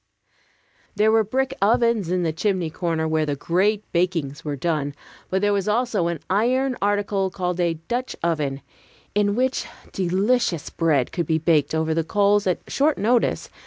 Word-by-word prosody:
There 215 Hz, +1 st, +3 dB
were 220 Hz, 0 st, +4 dB
brick 265 Hz, +5 st, -1 dB
ovens 225 Hz, -2 st, +2 dB
in 180 Hz, 0 st, 0 dB
the 160 Hz, -2 st, 0 dB
chimney 180 Hz, -1 st, -1 dB
corner, 165 Hz, -1 st, -1 dB
where 160 Hz, 0 st, +1 dB
the 145 Hz, -, -1 dB
great 195 Hz, +8 st, +1 dB
bakings 165 Hz, -4 st, -1 dB
were 150 Hz, -2 st, -3 dB
done; 145 Hz, -1 st, -2 dB, 0.3 s
but 190 Hz, +2 st, 0 dB
there 205 Hz, 0 st, +3 dB
was 200 Hz, -1 st, -1 dB
also 215 Hz, -5 st, +1 dB
an 170 Hz, -3 st, -3 dB
iron 250 Hz, +7 st, +1 dB
article 205 Hz, -1 st, 0 dB
called 180 Hz, -1 st, -3 dB
a 170 Hz, -2 st, +1 dB
"Dutch 240 Hz, +11 st, -4 dB
oven," 145 Hz, -5 st, -1 dB, 0.5 s
in 205 Hz, 0 st, +2 dB
which 255 Hz, +2 st, 0 dB, 0.2 s
delicious 190 Hz, -, 0 dB
bread 150 Hz, -7 st, +1 dB
could 170 Hz, -3 st, -2 dB
be 160 Hz, -, +2 dB
baked 160 Hz, -2 st, +2 dB
over 160 Hz, 0 st, 0 dB
the 165 Hz, 0 st, 0 dB
coals 205 Hz, +3 st, +2 dB
at 180 Hz, -, 0 dB
short 295 Hz, +2 st, +1 dB
notice. 230 Hz, +4 st, +1 dB
185 Hz, 165 wpm, -23 LUFS, 160-210 Hz, 0.5 s, were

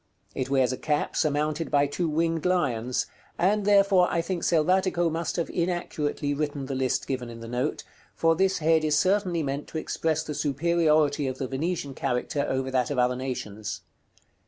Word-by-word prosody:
It 130 Hz, 0 st, -3 dB
wears 130 Hz, -2 st, +3 dB
a -, -, -6 dB
cap 150 Hz, -1 st, -1 dB
surmounted 155 Hz, +1 st, 0 dB
by 145 Hz, -1 st, +3 dB
two 160 Hz, +4 st, -2 dB
winged 165 Hz, +1 st, 0 dB
lions; 125 Hz, -10 st, 0 dB, 0.3 s
and, 200 Hz, +3 st, +2 dB
therefore, 200 Hz, -3 st, +5 dB
I 170 Hz, -, +1 dB
think 170 Hz, +1 st, -2 dB
Selvatico 175 Hz, +1 st, +2 dB
must 165 Hz, 0 st, -2 dB
have 170 Hz, -, -1 dB
inaccurately 170 Hz, -5 st, -1 dB
written 145 Hz, -1 st, -2 dB
the 135 Hz, -, -4 dB
list 130 Hz, -1 st, 0 dB
given 130 Hz, -3 st, -3 dB
in 115 Hz, 0 st, -9 dB
the 115 Hz, -, -8 dB
note, 125 Hz, +5 st, -2 dB, 0.3 s
for 165 Hz, 0 st, +3 dB
this 190 Hz, +2 st, +2 dB
head 160 Hz, 0 st, +3 dB
is 150 Hz, -1 st, +2 dB
certainly 185 Hz, -2 st, +2 dB
meant 140 Hz, +1 st, -3 dB
to -, -, -6 dB
express 160 Hz, 0 st, -1 dB
the 155 Hz, -, -5 dB
superiority 150 Hz, -1 st, +2 dB
of 130 Hz, 0 st, -3 dB
the 130 Hz, -, -3 dB
Venetian 145 Hz, +1 st, -2 dB
character 135 Hz, +2 st, -1 dB
over 130 Hz, 0 st, -1 dB
that 130 Hz, -2 st, +1 dB
of 145 Hz, -, -2 dB
other 125 Hz, 0 st, +2 dB
nations. 110 Hz, -5 st, -5 dB
150 Hz, 180 wpm, -26 LUFS, 130-170 Hz, 0.3 s, therefore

